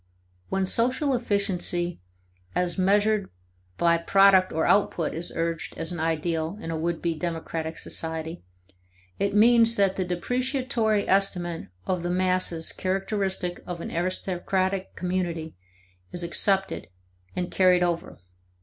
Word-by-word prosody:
When 190 0 0
social 255 +8 +2
efficiency 190 - 0 0.5
as 175 -1 0
measured 205 +2 +2 0.5
by 170 -1 +3
product 190 +1 +5
or 160 +1 0
output 195 -5 +2
is 170 +2 -3
urged 165 -1 -3
as 165 +1 -4
an 175 - -4
ideal 160 +2 -1
in 165 - -5
a - - -2
would 165 +1 -2
be 170 -1 +1
democratic 165 -1 -4
society, 160 0 -4 0.8
it 200 0 0
means 230 +1 +5
that 195 -2 +2
the 190 - +1
depreciatory 235 +3 0
estimate 180 -3 0 0.2
of 180 -2 -1
the 175 - -2
masses 180 -2 +1
characteristic 190 -1 -2
of 175 -1 -5
an - - -6
aristocratic 185 +2 -1
community 175 -3 -2 0.6
is 175 - -5
accepted 195 +3 +1 0.5
and 180 0 -2
carried 180 -1 +4
over. 170 -1 -2
180 Hz, 125 wpm, -26 LUFS, 170-195 Hz, 0.8 s, product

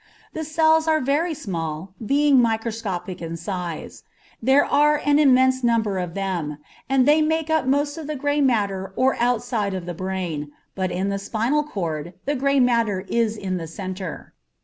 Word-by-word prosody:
The 315 - -4
cells 315 +1 +3
are 315 -1 +3
very 310 +5 0
small, 170 - -5
being 280 +2 +4
microscopic 220 -6 -2
in 165 0 -5
size; 175 -1 -5 0.4
there 265 +5 +4
are 295 0 +3
an 290 0 +4
immense 260 -2 +4
number 220 -5 +1
of 175 -2 -4
them, 175 -7 -2 0.3
and 270 -1 +3
they 300 +1 +5
make 320 0 0
up 315 -4 +1
most 285 +3 +1
of 310 - -7
the 305 - -3
gray 290 +1 0
matter 200 -7 0
or 260 +1 +2
outside 235 -4 0
of 180 -2 -5
the 175 - -4
brain, 175 -5 -4 0.2
but 185 -1 -2
in 190 +2 -1
the 200 0 -2
spinal 235 +9 0
cord 175 - -4
the 285 - 0
gray 275 +1 +2
matter 230 -6 +2
is 225 -2 +1
in 190 -3 -3
the 165 -2 -5
centre. 185 0 -7
230 Hz, 170 wpm, -23 LUFS, 185-285 Hz, 0.4 s, they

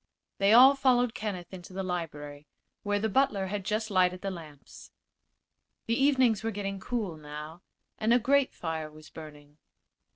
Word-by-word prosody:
They 200 +1 +4
all 255 +4 +9
followed 250 -3 +2
Kenneth 195 -4 -5
into 185 0 -10
the 190 +1 -3
library, 150 -5 -5 0.3
where 205 0 0
the 215 +2 0
butler 220 -4 +1
had 200 +1 -4
just 215 +2 -2
lighted 180 -1 +2
the 195 - -3
lamps. 155 -6 -12 1.0
The 230 - 0
evenings 260 -5 +3
were 225 - -1
getting 195 -2 -4
cool, 205 -6 -3
now, 150 +2 -9 0.4
and 220 +1 +1
a 240 - +6
grate 270 +3 +2
fire 160 -2 -4
was 155 +1 -15
burning. 150 -1 -12
195 Hz, 160 wpm, -29 LUFS, 160-225 Hz, 1.0 s, all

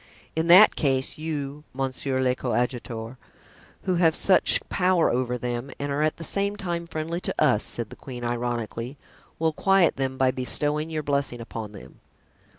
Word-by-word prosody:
"In 160 +1 0
that 185 +5 +8
case, 135 -1 0
you, 150 -2 -4
monsieur 135 0 -2
le 130 -1 +2
coadjuteur, 120 -1 -3 0.7
who 185 -1 0
have 165 -2 +4
such 190 - +4
power 180 -2 +2
over 125 0 -1
them 120 +2 -4
and 145 0 -3
are 140 +2 0
at 155 0 +1
the 165 - -7
same 200 +4 0
time 170 -4 -4
friendly 165 +2 -4
to - - -3
us," 130 -8 +3
said 115 -3 0
the - - -8
queen, 125 -3 -9
ironically, 120 +1 -3 0.4
"will 160 -1 +1
quiet 195 +1 +3
them 130 -1 -2
by 130 -1 +3
bestowing 145 +4 -1
your 155 -1 -3
blessing 140 -4 -1
upon 110 -2 -7
them." 100 - -13
140 Hz, 165 wpm, -25 LUFS, 125-160 Hz, 0.7 s, that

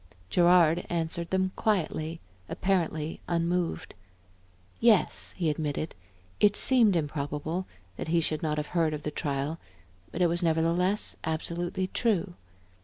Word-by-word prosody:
Gerard 175 -1 +5
answered 170 0 -2
them 190 0 +1
quietly, 165 -5 -1 0.3
apparently 165 -5 -1
unmoved. 170 0 -1 0.9
Yes, 225 -4 +3
he 170 - 0
admitted, 155 0 -2 0.5
it 205 0 +4
seemed 235 -7 +5
improbable 150 +3 -2 0.3
that - - -5
he 170 +1 +2
should 155 -1 -1
not 150 -1 -1
have 150 0 -3
heard 165 -3 +2
of 150 - -8
the 150 - -3
trial, 145 +1 -2 0.5
but - - -5
it - - +5
was 170 +1 0
nevertheless 170 +4 +1
absolutely 170 +3 -2
true. 195 -2 0
170 Hz, 125 wpm, -28 LUFS, 155-180 Hz, 0.9 s, Gerard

